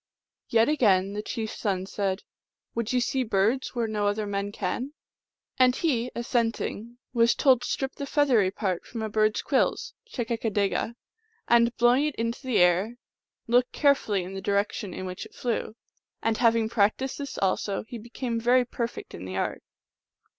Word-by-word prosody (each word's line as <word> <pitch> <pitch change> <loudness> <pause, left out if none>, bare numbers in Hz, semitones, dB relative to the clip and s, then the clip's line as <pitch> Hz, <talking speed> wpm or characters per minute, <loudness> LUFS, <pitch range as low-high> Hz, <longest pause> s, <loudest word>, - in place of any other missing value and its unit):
Yet 225 0 +4
again 200 -10 +3
the 210 - -3
chief 220 0 -4
s - - -9
son 190 -3 -1
said, 195 0 -2 0.2
" - - -64
Would 230 -1 -2
you 250 - +2
see 260 +2 0
birds 225 +4 +1
where 235 -1 +1
no 210 -1 0
other 210 +1 0
men 200 0 -2
can? 245 +9 -3 0.3
" - - -36
And 255 0 +5
he, 250 -7 0
assent 235 -1 0
ing, 235 +3 -5 0.2
was 235 -1 +4
told 260 -3 +4
to - - -4
strip 270 -1 -2
the 280 - -6
feathery 260 -10 +3
part 190 -2 -2
from 230 -2 -6
a 220 - -2
bird 215 0 +2
s - - -2
quills - - 0 0.2
(chekakadega), 225 - -1 0.5
and, 235 0 +4
blowing 245 +4 +4
it 300 - -4
into 230 +1 -2
the 255 -4 0
air, 180 +6 +3 0.5
look 245 +2 +3
carefully 270 - +2
in 185 +2 -7
the 195 - -5
direction 200 -1 -1
in 185 - -6
which 185 0 -6
it - - -24
flew. 230 -2 -2 0.5
And 225 -1 +1
having 230 -2 +3
practiced 225 +5 +1
this 280 -1 -5
also, 195 +1 0
he 240 - -7
became 235 +1 -4
very 245 +2 +4
perfect 235 0 -5
in - - -7
the 95 0 -6
art. - - -2
230 Hz, 185 wpm, -27 LUFS, 205-245 Hz, 0.5 s, And